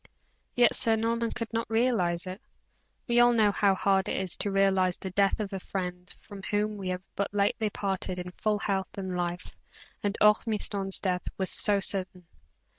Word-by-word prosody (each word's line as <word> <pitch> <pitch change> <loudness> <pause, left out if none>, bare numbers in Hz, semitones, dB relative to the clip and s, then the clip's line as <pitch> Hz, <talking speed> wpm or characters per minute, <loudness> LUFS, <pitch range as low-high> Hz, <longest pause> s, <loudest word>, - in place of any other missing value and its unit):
Yet, 245 -1 +5
Sir 225 -1 +5
Norman 230 +1 -1
could 230 -1 -5
not 230 -1 -2
realize 220 -7 +1
it. 185 +4 -7 0.7
We 240 -1 +3
all 240 0 +6
know 215 -3 +4
how 200 -1 +2
hard 190 0 +1
it - - -1
is 190 -3 -2
to 205 - +1
realize 195 -2 +2
the 190 - -6
death 195 +2 +2
of 205 -2 -4
a 195 - -3
friend 180 -1 -5
from 200 -2 -11
whom 210 +1 0
we 195 -2 -5
have 185 0 -3
but 200 - -2
lately 205 +1 +1
parted 190 -2 -3
in 180 0 -5
full 210 +3 -1
health 195 -2 -3
and 190 -2 -4
life, 175 0 -3 0.5
and 205 0 -1
Ormiston's 210 -2 +2
death 180 -2 -2
was 190 -1 0
so 205 -1 +2
sudden. 185 -2 -2
195 Hz, 185 wpm, -28 LUFS, 185-215 Hz, 0.7 s, all